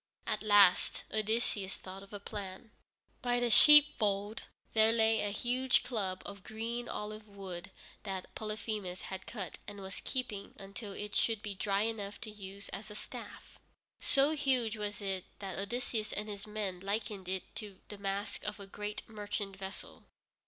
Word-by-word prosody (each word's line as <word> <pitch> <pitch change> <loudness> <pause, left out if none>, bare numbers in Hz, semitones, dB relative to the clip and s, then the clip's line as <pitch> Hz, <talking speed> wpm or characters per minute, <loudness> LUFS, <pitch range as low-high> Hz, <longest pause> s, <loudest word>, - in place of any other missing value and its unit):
At - - 0
last 205 -3 +6
Odysseus 215 -2 +1
thought 190 +1 -8
of 200 - -13
a 205 - -5
plan. 200 +1 -6 0.5
By 245 -1 +2
the 240 -1 +2
sheepfold 220 -8 +7 0.3
there 220 0 +7
lay 225 -1 +4
a 205 - +1
huge 245 +5 +2
club 195 -6 -2
of 200 -1 -7
green 230 +2 -3
olive 215 +1 -4
wood 195 -2 -7 0.3
that 190 -2 -4
Polyphemus 210 -3 -3
had 190 - -6
cut 205 -6 -5
and 205 -1 -6
was 190 -1 -5
keeping 215 -6 -3
until 200 +1 -7
it 205 +1 -5
should 225 -2 +2
be 205 - -2
dry 200 +1 +1
enough 210 -3 -3
to 220 - -5
use 200 -1 -7
as 210 +2 -6
a 210 - -8
staff. - - -8 0.4
So 275 +2 +4
huge 260 -7 +2
was 205 -1 -3
it 190 -2 -1
that 195 -3 -4
Odysseus 215 +1 -1
and 210 +1 -2
his 205 0 -5
men 210 -4 -2
likened 200 -1 -2
it 190 -1 -3
to 205 -3 -6
the 205 - -7
mast 200 +1 -2
of 210 0 -3
a 200 - -7
great 210 +1 -5
merchant 205 -2 -3
vessel. 195 0 -6
205 Hz, 165 wpm, -34 LUFS, 195-220 Hz, 0.5 s, sheepfold